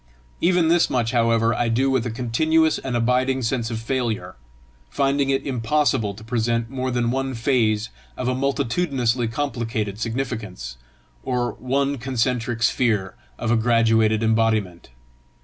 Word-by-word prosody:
Even 175 -1 +3
this 170 +1 +3
much, 120 -3 0
however, 115 -1 +2
I 120 0 0
do 130 +4 +2
with 130 -2 +1
a - - -2
continuous 155 +7 +1
and 130 -2 -4
abiding 130 +2 +1
sense 115 -1 -1
of 115 - -3
failure, 115 -6 -2 0.5
finding 135 - +1
it 135 0 0
impossible 125 -4 0
to 110 - -12
present 115 0 -1
more 130 -1 -2
than 120 -1 0
one 135 0 -2
phase 115 -3 +1 0.3
of 125 - -3
a 130 - +1
multitudinously 130 -2 0
complicated 115 -5 -3
significance, 115 - -4 0.4
or 120 - -1
one 140 +3 -1
concentric 120 -1 -1
sphere 110 -5 +1 0.2
of 120 - -2
a - - +4
graduated 115 -1 +3
embodiment. 110 - 0
120 Hz, 140 wpm, -22 LUFS, 115-135 Hz, 0.5 s, a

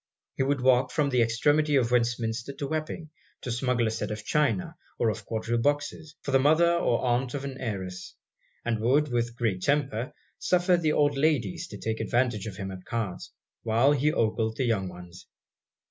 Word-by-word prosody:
He - - -3
would 135 0 +1
walk 125 0 +4
from 145 -3 +1
the 125 -2 +3
extremity 145 +6 +2
of 120 -3 +2
Westminster 120 +1 0
to 140 +1 -5
Wapping, 155 +1 -4 0.3
to 125 - -4
smuggle 120 0 +1
a 110 - 0
set 110 - -3
of 105 0 -5
china 135 -11 0 0.2
or 115 - +2
of - - -8
quadrille 115 +1 -1
boxes, 145 +2 -1
for 140 - -3
the 135 - +5
mother 160 +5 +4
or 150 -8 +1
aunt 125 +2 0
of 140 -1 -4
an 135 -1 -6
heiress; 95 -6 -5 0.5
and 115 -2 0
would, 140 +7 +2
with 120 -1 -1
great 110 -6 -1
temper, 135 -2 0 0.3
suffer 180 0 +3
the 160 -3 +1
old 145 -1 +3
ladies 135 - 0
to - - -9
take 110 0 -3
advantage 120 -4 0
of 100 - -6
him 95 -1 -5
at 95 -1 -9
cards, 110 -5 -4 0.3
while 115 +5 +3
he 145 +1 +2
ogled 110 -2 0
the 130 - +1
young 100 -6 0
ones. 90 0 -12
125 Hz, 190 wpm, -27 LUFS, 110-145 Hz, 0.5 s, the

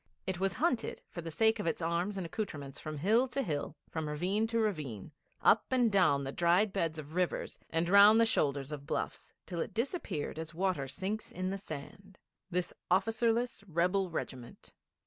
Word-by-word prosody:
It 185 -2 -2
was 195 -1 +1
hunted 300 - 0
for 170 - -5
the 165 - -6
sake 220 +6 +3
of 205 - -2
its 165 - 0
arms 170 +4 -1
and 185 - -3
accoutrements 155 -7 -5
from 155 -1 -5
hill 220 - +3
to 270 +2 -1
hill, 150 - -3
from 160 -2 -3
ravine 190 +9 0
to 230 +1 -1
ravine, 155 - -2 0.3
up 220 - +5
and 245 -3 +3
down 180 -8 +4
the 135 - -3
dried 175 +6 +3
beds 165 -5 0
of 155 0 -8
rivers 180 0 -1
and 165 +1 +1
round 200 +4 +8
the 230 - +6
shoulders 140 -8 0
of 145 -1 -6
bluffs, - - -3
till 175 -2 -5
it - - -5
disappeared 225 - -2
as 160 0 -6
water 180 -6 0
sinks 195 +10 -4
in 185 +1 -2
the 195 - -2
sand 185 +4 -9 0.3
this 180 -1 -1 0.2
officerless, 225 +5 +1
rebel 180 +3 +1
regiment. 130 -7 -6
180 Hz, 185 wpm, -32 LUFS, 155-210 Hz, 0.3 s, round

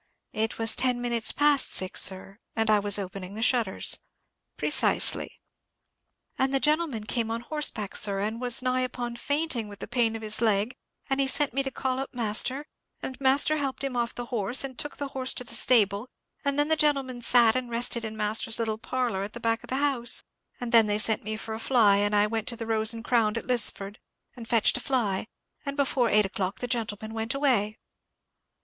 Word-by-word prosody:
"It 220 +1 -2
was 225 -1 +4
ten 250 -1 0
minutes 235 -2 +1
past 290 -1 +3
six, 185 -1 0
sir, 195 +2 -1 0.2
and 225 -1 +1
I 210 - +4
was 205 0 +2
opening 195 0 -6
the 220 - -3
shutters." 235 -6 0 0.6
"Precisely." - - +2 1.0
"And 265 0 +1
the 270 - +2
gentleman 300 -6 0
came 225 +1 -2
on 230 +1 -3
horseback, 240 -8 -3
sir, 200 -2 +2
and 220 +4 -3
was 245 0 -1
nigh 255 0 +1
upon 245 -1 -4
fainting 285 -2 -1
with 205 -1 -10
the - - -8
pain 235 -2 0
of 225 - -7
his 215 +1 +1
leg; 220 +2 +1 0.3
and 270 0 0
he 275 - +2
sent 280 -1 +2
me 275 - +2
to 270 - -3
call 260 -1 -3
up 270 - -6
master, 245 +5 0 0.4
and 265 +1 -7
master 275 +3 +3
helped 275 -2 -3
him 270 -2 -3
off 235 -1 -2
the 245 - -5
horse, 230 +3 +2
and 260 -2 -7
took 295 - -4
the 285 -1 -4
horse 260 -1 -2
to - - -3
the 230 - -8
stable; 225 -1 +3 0.3
and 280 0 -1
then 290 0 +3
the 315 - +5
gentleman 275 -5 0
sat 235 -2 +5
and 255 -1 -2
rested 235 0 0
in 220 -1 -6
master's 215 +1 0
little 220 -2 -2
parlour 240 -4 -2
at 205 +1 -6
the - - -7
back 230 0 0
of - - -12
the 260 - -2
house; 270 -4 0 0.4
and 245 -1 -5
then 225 -2 +6
they 205 0 +1
sent 220 0 +2
me 215 +1 -4
for 220 0 -7
a 220 - -5
fly, 225 -5 +4
and 205 +1 +1
I 205 0 +4
went 220 0 -3
to 235 - -2
the 230 - -6
Rose 220 -1 +2
and 230 0 -4
Crown 230 -3 +2
at - - -5
Lisford, 210 -4 +1 0.4
and 235 -3 -10
fetched 230 +1 +3
a - - -6
fly; 220 -8 -1 0.4
and 280 0 -5
before 265 -4 +1
eight 210 -1 +4
o'clock 190 0 -3
the 245 - -4
gentleman 220 -3 -3
went 225 +2 -3
away." 240 -7 +1
235 Hz, 210 wpm, -26 LUFS, 215-260 Hz, 1.0 s, then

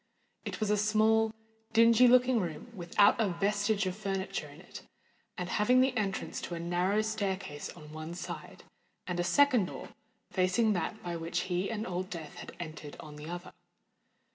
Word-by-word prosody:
It - - -4
was 215 -2 0
a 210 - +3
small, 220 +1 +3 0.4
dingy 230 +2 +7
looking 250 0 +5
room, 175 +5 -5
without 200 +3 +3
a 220 - +3
vestige 200 +3 +1
of 185 -1 -2
furniture 195 -2 -3
in - - -14
it, - - -11 0.6
and 180 -2 -3
having 210 +7 +3
the 260 0 +3
entrance 200 -4 -2
to 175 - -5
a - - -5
narrow 180 +5 +1
staircase 195 -8 -3
on 155 -3 -11
one 155 +2 -6
side, 180 - -7 0.4
and 180 -1 -3
a - - +2
second 260 0 +4
door, - - -8 0.4
facing 190 +4 +2
that 215 +3 -3
by 175 -1 -3
which 165 +2 -2
he 185 +1 -1
and 220 -1 -3
Old 185 +1 -3
Death 165 -5 -7
had - - -9
entered, 155 -3 -7
on 150 -2 -10
the 150 +2 -8
other. 175 +1 -7
195 Hz, 175 wpm, -31 LUFS, 175-220 Hz, 0.6 s, dingy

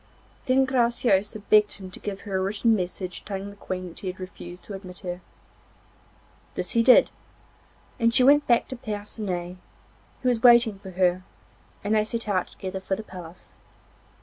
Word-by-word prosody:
Then 265 +1 +4
Graciosa 235 -5 +1
begged 210 -1 +5
him 190 -2 -7
to - - -8
give 200 -1 -5
her 200 -3 -5
a - - 0
written 210 +4 +2
message 185 -1 -4
telling 200 0 -5
the - - -14
Queen 185 -2 -5
that 165 - -10
he 195 - -6
had 185 +1 -5
refused 180 -1 -9
to 210 - -9
admit 185 -2 -9
her. 180 -1 -5 1.3
This - - -3
he 230 - +3
did, 250 +2 +6 0.9
and 230 -1 +3
she 250 - +4
went 290 +3 +5
back 240 -1 +3
to 260 - -5
Percinet, 205 -6 -5 0.7
who - - 0
was 235 -2 0
waiting 235 -4 +6
for 195 - -10
her, 180 0 +2 0.6
and 205 +2 0
they 215 -1 +4
set 230 +1 -4
out 185 -3 0
together 190 -1 -6
for 190 0 -2
the 220 - -7
palace. 180 -4 -11
200 Hz, 175 wpm, -25 LUFS, 185-230 Hz, 1.3 s, did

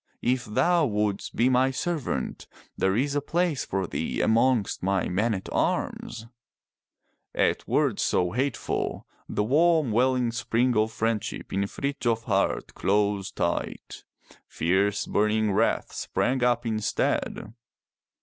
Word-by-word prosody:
If 125 0 +1
thou 145 +9 +2
wouldst 105 -2 -2
be 120 - +3
my 130 +1 +3
servant, 135 - -3 0.3
there 95 0 +1
is 140 +5 0
a 145 - 0
place 165 -1 0
for 95 0 -2
thee - - -3
amongst 115 -1 +2
my 95 0 0
men 105 +5 +1
at 95 - -6
arms!" 115 -1 -2 1.1
At - - +1
words - - +1
so 90 -1 +1
hateful, 130 +2 -2 0.2
the 105 - 0
warm 155 +2 +3
welling 125 +1 +2
spring 120 +1 0
of 110 +1 +2
friendship 110 0 -2
in 100 +1 0
Frithjof's 120 -3 -2
heart 100 -2 0
closed 100 -1 0
tight. - - -3 0.4
Fierce 95 +5 +1
burning 105 0 +1
wrath 110 +4 +1
sprang 130 0 -1
up 120 -1 +2
instead. 110 0 -1
115 Hz, 125 wpm, -26 LUFS, 105-130 Hz, 1.1 s, be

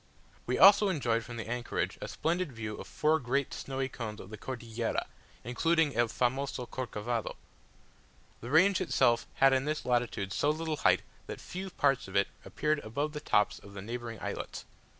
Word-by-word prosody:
We 125 - +1
also 200 +1 +8
enjoyed 120 -9 +1
from 120 0 -8
the 110 - -5
anchorage 120 +1 -2
a - - -4
splendid 170 -1 -1
view 110 -3 -5
of - - -8
four 155 +1 +2
great 135 +1 -1
snowy 135 0 -3
cones 110 -5 -6
of 95 - -10
the - - -5
Cordillera, 115 -2 -3 0.4
including 160 +4 +2
"el 120 0 +3
famoso 125 +2 -1
Corcovado;" 120 -2 -3 1.0
the 120 - -7
range 185 +7 +5
itself 125 -9 +2
had 135 0 +5
in 130 +1 +2
this 155 +1 -2
latitude 120 -6 0
so 145 - +2
little 155 0 -1
height, - - +3 0.2
that - - -6
few 190 +1 -6
parts 140 - +1
of 95 - -9
it 100 0 +3
appeared 155 0 0
above 145 +6 -3
the 150 - -4
tops 105 -8 +2
of 100 0 -14
the 100 - -5
neighbouring 115 0 -5
islets. - - -5
125 Hz, 175 wpm, -31 LUFS, 115-150 Hz, 1.0 s, also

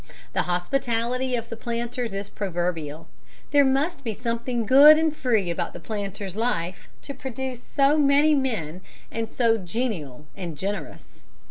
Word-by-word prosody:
The - - +2
hospitality 240 +7 0
of 230 -1 -4
the - - -5
planters 235 +1 -3
is 200 +1 -4
proverbial: 170 -6 -3 0.4
there 285 0 +6
must 275 +3 +1
be 225 -4 -3
something 235 +1 -2
good 285 +6 +9
and 315 -1 +1
free 220 - +1
about 170 - -3
the - - -8
planter's 200 -3 -5
life 185 -6 -2
to 280 - -6
produce 260 -1 -6
men 275 - +3 0.5
so 230 -2 +2
genial 175 - -4
and 175 -6 -6
generous. 200 +6 -5
230 Hz, 130 wpm, -25 LUFS, 185-265 Hz, 0.5 s, good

